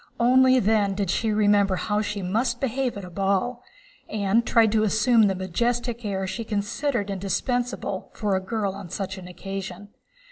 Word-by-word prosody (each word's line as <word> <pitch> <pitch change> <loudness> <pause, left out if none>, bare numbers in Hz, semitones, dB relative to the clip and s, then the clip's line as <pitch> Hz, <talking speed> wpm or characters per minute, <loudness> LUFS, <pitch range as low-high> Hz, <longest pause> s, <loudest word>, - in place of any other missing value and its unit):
Only 255 +2 +5
then 205 -2 +2
did 195 -3 -1
she 225 +2 0
remember 205 -2 +3
how 210 +3 -1
she 205 -2 -3
must 235 +6 0
behave 260 -2 -1
at 200 - -6
a 180 - -11
ball, 195 +6 0 0.5
and 215 +2 +1
tried 230 -2 +4
to 220 0 +2
assume 220 +1 +4
the 195 - 0
majestic 235 +6 -1
air 195 -2 -2
she 230 +5 -4
considered 210 +1 -2
indispensable 200 +2 -2
for 205 -3 0
a 190 - 0
girl 200 0 -2
on 195 -2 -9
such 190 +1 -4
an 180 - -10
occasion. 195 +2 -7
205 Hz, 170 wpm, -25 LUFS, 195-235 Hz, 0.5 s, Only